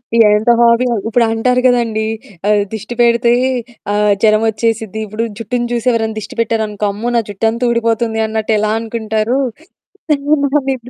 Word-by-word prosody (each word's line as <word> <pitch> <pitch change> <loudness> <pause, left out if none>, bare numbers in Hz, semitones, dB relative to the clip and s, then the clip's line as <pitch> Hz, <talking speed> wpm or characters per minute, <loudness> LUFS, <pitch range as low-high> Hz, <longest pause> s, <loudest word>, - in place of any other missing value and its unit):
ఈ - - +3 0.2
ఎంత 220 +3 +2
హాబీయో, 235 +1 +3
ఇప్పుడంటారు 230 +2 +1
గదండీ! 230 -3 +2 0.4
ఆహ్, 210 -1 +3
దిష్టి 220 +3 -6
పెడితే 235 0 +3 0.6
ఆహ్, 210 0 +3
జరమొచ్చేసిద్ది. 220 0 +1
ఇప్పుడు 215 +3 -3
జుట్టుని 240 +1 -2
చూసి 240 +1 -2
ఎవరైనా 220 -2 -1
దిష్టి 215 - -10
పెట్టారనుకో 215 -2 -1
అమ్మో! 220 +4 -4
నా 230 - +3
జుట్టంతా 225 +4 -1
ఊడిపోతుంది 230 -1 0
అన్నట్టెలా 215 -1 0
అనుకుంటారు? 220 +1 -2 0.7
సేమ్ 285 0 -1 0.2
అలానే 275 -1 0
225 Hz, 130 wpm, -15 LUFS, 215-240 Hz, 0.7 s, ఈ